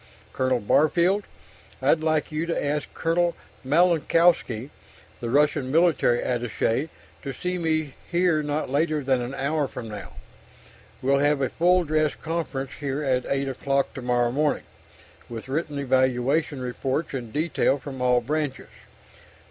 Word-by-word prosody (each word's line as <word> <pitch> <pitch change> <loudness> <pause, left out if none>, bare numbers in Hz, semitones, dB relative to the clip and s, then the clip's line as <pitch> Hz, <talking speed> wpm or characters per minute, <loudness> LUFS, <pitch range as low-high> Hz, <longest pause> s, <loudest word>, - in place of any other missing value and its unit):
Colonel 130 -1 +1
Barfield, 170 - +2 0.5
I'd 140 +4 +3
like 155 -1 0
you 155 +2 -2
to 165 - -1
ask 145 0 -2
Colonel 170 +1 +1 0.3
Malinowski, 160 -4 +3 0.5
the 120 - -4
Russian 145 0 +2
military 160 -7 +3
attaché 120 +3 -1 0.3
to 140 - -5
see 180 +6 -3
me 155 -4 0 0.2
here 175 -3 +2
not 150 +1 -2
later 150 +1 +1
than 130 -1 +1
an 125 +3 -4
hour 140 +2 0
from 115 - -7
now. 100 -6 -8 0.9
We'll 140 +1 +3
have 145 0 +2
a 135 - 0
full 180 +2 +3
dress 155 -1 +1
conference 155 -5 -4
here 140 0 -2
at 130 -2 0
8 140 0 0
o'clock 135 +1 -1
tomorrow 120 -2 0
morning, 150 +3 0 0.7
with 115 +1 -7
written 150 +1 -2
evaluation 130 +2 +1
reports 130 +5 -2
in 125 -4 -4
detail 150 0 +1
from 135 -2 -8
all 125 -1 +3
branches. 145 +1 -3
Dr. - - -23
145 Hz, 140 wpm, -25 LUFS, 130-155 Hz, 0.9 s, I'd